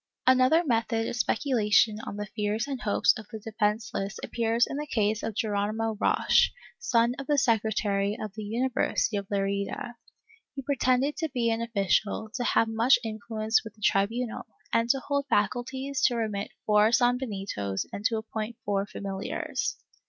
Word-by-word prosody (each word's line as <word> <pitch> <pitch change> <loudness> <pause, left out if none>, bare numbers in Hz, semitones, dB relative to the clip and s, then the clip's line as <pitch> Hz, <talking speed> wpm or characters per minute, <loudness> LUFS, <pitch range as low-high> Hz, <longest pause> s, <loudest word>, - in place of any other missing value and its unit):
^ - - -63 0.2
Another 255 +6 +5
method 225 -3 0
of - - -3
speculation 220 -2 +2
on - - -5
the 205 - -3
fears 210 +2 -2
and 270 -3 -4
hopes 210 - +3
of 220 - -11
the 225 - -7
defenceless 210 -2 -2
appears 230 0 +1
in 275 - -5
the 300 +1 -4
case 215 -3 0
of 220 - -4
Geronimo 215 +1 -1
Roche, - - +4 0.3
son 235 - +2
of 275 - -6
the 295 -1 +2
secretary 215 -4 +1
of 215 -2 -5
the 215 - -7
University 230 0 0
of 200 -1 -4
Lerida. 200 +4 -2 0.6
He 270 - -5
pretended 265 +1 +1
to 320 - -2
be 235 -3 0
an 225 0 -1
official, 215 -1 0
to 250 - -2
have 230 - +3
much 225 +4 +4
influence 220 0 -1
with 220 -2 -10
the 215 - -23
tribunal, 225 +5 0 0.3
and 230 +1 +2
to 270 - +3
hold 280 0 -1
faculties 260 +6 -1
to 245 - -1
remit 215 -3 -2 0.2
four 210 0 +5
sanbenitos 205 - 0
and 200 - -5
to 225 -1 +2
appoint 220 +1 -5
four 200 0 0
familiars. 195 -1 -3
225 Hz, 165 wpm, -27 LUFS, 210-245 Hz, 0.6 s, Another